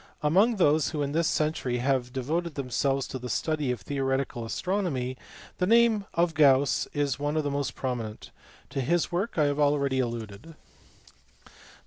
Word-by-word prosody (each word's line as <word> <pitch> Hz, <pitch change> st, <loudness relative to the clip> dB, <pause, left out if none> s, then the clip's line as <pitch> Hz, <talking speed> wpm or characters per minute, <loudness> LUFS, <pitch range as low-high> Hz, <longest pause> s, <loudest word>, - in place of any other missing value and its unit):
Among 195 Hz, +10 st, +4 dB
those 155 Hz, -5 st, +3 dB
who 150 Hz, -3 st, -2 dB
in 140 Hz, -, -2 dB
this 165 Hz, +2 st, +1 dB
century 150 Hz, -5 st, 0 dB
have 125 Hz, 0 st, 0 dB
devoted 155 Hz, +6 st, -2 dB
themselves 135 Hz, 0 st, 0 dB
to 130 Hz, -, -6 dB
the 125 Hz, 0 st, -6 dB
study 155 Hz, -2 st, -1 dB
of 120 Hz, -5 st, -4 dB
theoreti 135 Hz, -1 st, 0 dB
cal 120 Hz, -1 st, -7 dB
astronomy 145 Hz, -, -2 dB, 0.4 s
the 180 Hz, -, +1 dB
name 230 Hz, -2 st, +4 dB
of 170 Hz, -1 st, +2 dB
Gauss 140 Hz, -3 st, +4 dB
is 145 Hz, -3 st, -1 dB
one 145 Hz, +2 st, -1 dB
of 155 Hz, -, +1 dB
the 145 Hz, -, -2 dB
most 140 Hz, -3 st, -2 dB
prominent; 120 Hz, -5 st, -5 dB, 0.4 s
to 135 Hz, -, -2 dB
his 170 Hz, +7 st, 0 dB
work 185 Hz, +6 st, -2 dB
I 155 Hz, -, +4 dB
have 145 Hz, 0 st, 0 dB
already 140 Hz, -2 st, +2 dB
alluded. 115 Hz, +4 st, -5 dB
145 Hz, 165 wpm, -27 LUFS, 130-160 Hz, 0.4 s, Among